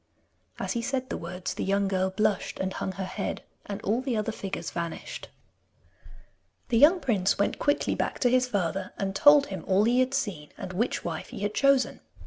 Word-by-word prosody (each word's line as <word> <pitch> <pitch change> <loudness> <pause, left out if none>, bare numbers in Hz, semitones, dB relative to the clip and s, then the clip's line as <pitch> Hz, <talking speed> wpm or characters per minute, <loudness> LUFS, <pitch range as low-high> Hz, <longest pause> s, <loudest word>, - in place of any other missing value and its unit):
As - - -3
he 235 - -1
said 260 +1 -2
the - - -1
words 180 +2 -5
the - - -4
young 200 0 +1
girl 190 -1 +1
blushed 210 +1 0
and 190 0 -2
hung 190 - -3
her 190 +1 -4
head, 195 +2 -4 0.2
and 200 -1 -4
all 225 +5 +1
the 260 -4 -1
other 215 +1 -1
figures 195 -3 -5
vanished. 170 -1 -5 1.4
The 230 -3 +3
young 330 +7 +7
prince 205 - +1
went 200 - 0
quickly 290 - +1
back - - -2
to 245 - +4
his 255 0 +3
father, 195 -5 -2
and 195 -1 -2
told 290 +5 +7
him 185 - -5
all 195 +1 +4
he 240 +3 +3
had 255 +1 +2
seen 190 - -3
and 185 - -6
which 230 +7 -1
wife 165 -2 -4
he - - -8
had 205 0 -1
chosen. 275 0 +3
205 Hz, 200 wpm, -27 LUFS, 190-255 Hz, 1.4 s, young